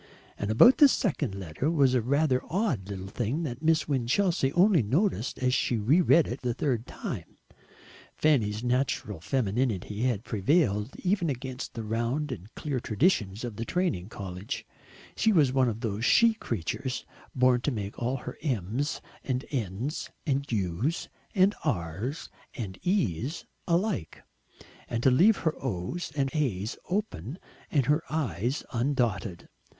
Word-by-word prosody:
And 100 Hz, -, -3 dB
about 180 Hz, -, +7 dB
this 285 Hz, -3 st, +8 dB
second 150 Hz, -, -1 dB
letter 95 Hz, -, -2 dB
was 140 Hz, -6 st, +3 dB
a 125 Hz, -, +3 dB
rather 135 Hz, +2 st, +2 dB
odd 155 Hz, -, -1 dB
little 95 Hz, -2 st, -5 dB
thing 120 Hz, +10 st, -2 dB
that 125 Hz, -4 st, -4 dB
Miss 160 Hz, 0 st, +2 dB
Winchelsea 140 Hz, +3 st, +1 dB
only 180 Hz, -2 st, +5 dB
noticed 135 Hz, -, 0 dB
as 125 Hz, -1 st, +1 dB
she 120 Hz, -, +1 dB
re 130 Hz, -, +4 dB
read 165 Hz, -2 st, +5 dB
it 125 Hz, -, -5 dB
the 120 Hz, -2 st, -1 dB
third 125 Hz, -5 st, -1 dB
time. -, -, -6 dB, 0.8 s
Fanny's 115 Hz, -8 st, +2 dB
natural 125 Hz, -6 st, 0 dB
femininity 110 Hz, -1 st, -1 dB
had 120 Hz, -4 st, 0 dB
prevailed 110 Hz, -, +1 dB
even 180 Hz, -3 st, +1 dB
against 130 Hz, -2 st, -5 dB
the 115 Hz, -, -4 dB
round 120 Hz, +7 st, -1 dB
and 105 Hz, -2 st, -7 dB
clear 140 Hz, -4 st, -2 dB
traditions 110 Hz, -, +1 dB
of 115 Hz, -4 st, -5 dB
the 115 Hz, -, -2 dB
training 115 Hz, -, -1 dB
college; 95 Hz, -2 st, -6 dB, 0.5 s
she 220 Hz, -, +3 dB
was 150 Hz, -9 st, +4 dB
one 130 Hz, -2 st, +3 dB
of 115 Hz, 0 st, -5 dB
those 110 Hz, -2 st, -2 dB
she 230 Hz, -, +5 dB
creatures 125 Hz, -, -3 dB, 0.3 s
born 125 Hz, -1 st, +4 dB
to 145 Hz, -, 0 dB
make 105 Hz, -6 st, -4 dB
all 125 Hz, +3 st, 0 dB
her -, -, -8 dB
m's 130 Hz, -, -1 dB, 0.2 s
and 130 Hz, 0 st, -2 dB
n's 120 Hz, -, -3 dB, 0.2 s
and 140 Hz, -2 st, -1 dB
u's 105 Hz, -, -1 dB, 0.3 s
and 195 Hz, +1 st, +5 dB
r's 110 Hz, -, -3 dB, 0.2 s
and 100 Hz, -7 st, -6 dB
e's 155 Hz, -, -1 dB, 0.2 s
alike, 170 Hz, -, -1 dB, 0.6 s
and 115 Hz, 0 st, -2 dB
to 130 Hz, -, +6 dB
leave 200 Hz, -, +5 dB
her 160 Hz, -, +3 dB
o's 125 Hz, -, -3 dB
and 135 Hz, -2 st, 0 dB
a's 115 Hz, -, -1 dB
open 175 Hz, -, -2 dB, 0.3 s
and 140 Hz, -5 st, +2 dB
her 150 Hz, +4 st, +3 dB
i's 125 Hz, -, -1 dB
undotted. 115 Hz, -7 st, -1 dB
125 Hz, 150 wpm, -28 LUFS, 105-155 Hz, 0.8 s, this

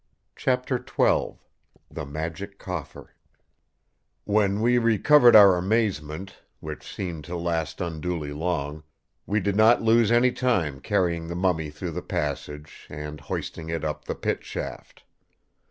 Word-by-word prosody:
Chapter -, -, 0 dB
XII -, -, +1 dB, 0.6 s
The 75 Hz, -, -6 dB
Magic 80 Hz, +7 st, -5 dB
Coffer 90 Hz, -7 st, -7 dB, 1.1 s
"When 100 Hz, -1 st, +1 dB
we 120 Hz, +2 st, +3 dB
recovered 120 Hz, +3 st, +5 dB
our 100 Hz, -4 st, +9 dB
amazement, 95 Hz, -4 st, -1 dB, 0.2 s
which 75 Hz, -1 st, -8 dB
seemed 85 Hz, -5 st, -5 dB
to 90 Hz, -, -5 dB
last 85 Hz, -2 st, -2 dB
unduly 80 Hz, -3 st, -3 dB
long, 75 Hz, -2 st, -3 dB, 0.5 s
we 105 Hz, +2 st, +1 dB
did 100 Hz, -1 st, -1 dB
not 110 Hz, +3 st, +5 dB
lose 115 Hz, 0 st, +4 dB
any 120 Hz, +2 st, +4 dB
time 95 Hz, -, 0 dB
carrying 85 Hz, +3 st, 0 dB
the 85 Hz, -, -5 dB
mummy 90 Hz, -4 st, 0 dB
through 80 Hz, +4 st, -6 dB
the 90 Hz, +3 st, -4 dB
passage, 75 Hz, 0 st, -5 dB
and 75 Hz, 0 st, -7 dB
hoisting 80 Hz, 0 st, -5 dB
it 80 Hz, -2 st, -3 dB
up 75 Hz, -1 st, -4 dB
the -, -, -3 dB
Pit -, -, -2 dB
shaft. -, -, -7 dB
90 Hz, 135 wpm, -25 LUFS, 75-105 Hz, 1.1 s, our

